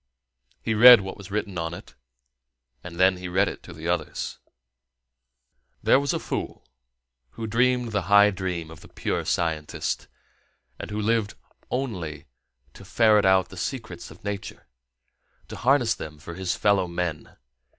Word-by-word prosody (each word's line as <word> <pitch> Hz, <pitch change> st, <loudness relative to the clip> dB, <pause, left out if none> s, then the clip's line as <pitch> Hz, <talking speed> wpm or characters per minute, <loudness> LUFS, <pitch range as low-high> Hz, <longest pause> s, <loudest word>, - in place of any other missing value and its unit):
He 115 Hz, -, 0 dB
read 120 Hz, +1 st, +9 dB
what 95 Hz, 0 st, -6 dB
was 100 Hz, -1 st, -12 dB
written 100 Hz, -3 st, -3 dB
on 80 Hz, 0 st, -3 dB
it, -, -, -12 dB, 0.9 s
and 85 Hz, -1 st, -9 dB
then 95 Hz, 0 st, +4 dB
he 90 Hz, 0 st, -6 dB
read 95 Hz, +3 st, +2 dB
it -, -, -6 dB
to -, -, -12 dB
the 80 Hz, 0 st, -7 dB
others: 85 Hz, -3 st, -3 dB, 1.4 s
There -, -, +5 dB
was 140 Hz, -1 st, -1 dB
a -, -, 0 dB
fool -, -, -5 dB, 0.7 s
who 115 Hz, -, -6 dB
dreamed 120 Hz, +1 st, +1 dB
the 100 Hz, -2 st, 0 dB
high 100 Hz, 0 st, +7 dB
dream 90 Hz, -4 st, -4 dB
of 80 Hz, -, -12 dB
the -, -, -14 dB
pure -, -, -3 dB
scientist, 80 Hz, -3 st, -2 dB, 0.7 s
and -, -, -7 dB
who 105 Hz, 0 st, -4 dB
lived 110 Hz, -1 st, 0 dB, 0.3 s
only 90 Hz, -, -4 dB, 0.5 s
to -, -, -13 dB
ferret 105 Hz, +1 st, +3 dB
out 95 Hz, -1 st, +4 dB
the 95 Hz, -, -12 dB
secrets 110 Hz, -4 st, -5 dB
of 85 Hz, -, -15 dB
nature, 100 Hz, -1 st, -6 dB, 0.8 s
and -, -, -8 dB
harness 125 Hz, -2 st, +3 dB
them 75 Hz, -1 st, -8 dB
for 85 Hz, +3 st, -9 dB
his 95 Hz, +1 st, -2 dB
fellow 100 Hz, -3 st, +2 dB
men. 85 Hz, -3 st, -4 dB
95 Hz, 155 wpm, -25 LUFS, 85-110 Hz, 1.4 s, read